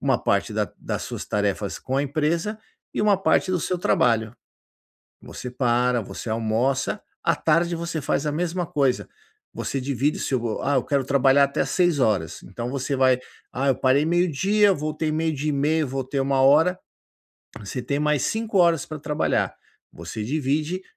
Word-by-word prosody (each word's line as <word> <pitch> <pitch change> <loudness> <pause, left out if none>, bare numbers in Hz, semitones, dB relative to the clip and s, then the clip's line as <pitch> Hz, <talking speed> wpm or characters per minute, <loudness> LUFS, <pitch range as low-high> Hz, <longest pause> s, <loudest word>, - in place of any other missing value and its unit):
uma - - +2
parte - - +1
da - - -2
das - - -4
suas - - -6
tarefas 100 -1 -1
com 130 - -3
a 140 - +2
empresa 160 +9 -1 0.4
e - - 0
uma 205 -2 +4
parte 190 0 +2
do 185 - +1
seu 180 - -1
trabalho. 115 -8 +1 0.9
Você 125 - -8
para, 125 -1 +1
você 110 +2 -7
almoça; 115 +4 0 0.2
à - - +2
tarde 170 +2 +2
você 165 -1 -3
faz 140 +1 -1
a 150 - 0
mesma 175 +3 -1
coisa. 140 -7 0 0.5
Você 135 - -3
divide 140 +2 0
o - - -6
seu: 120 -4 -2
"Ah, 140 0 +1
eu - - +1
quero 140 -3 0
trabalhar 140 +1 +4
até 140 - -2
às - - -4
18h.", 130 - +1
então 120 +6 -6
você 135 +1 -2
vai: 130 -1 +4 0.3
"Ah, 135 +2 -1
eu 135 - +4
parei 135 +3 +3
meio-dia, 185 +5 +3
voltei 155 -1 -2
12h30, 155 -1 0
voltei 135 +1 -3
13h". 140 +7 +4 0.8
Você 105 +5 -5
tem 140 +4 -2
mais 150 -3 +1
5 220 -2 -1
horas 170 -4 +4
para 155 -1 -7
trabalhar. 150 0 0 0.4
Você 110 -1 -6
divide 150 - -1
140 Hz, 165 wpm, -24 LUFS, 130-165 Hz, 0.9 s, uma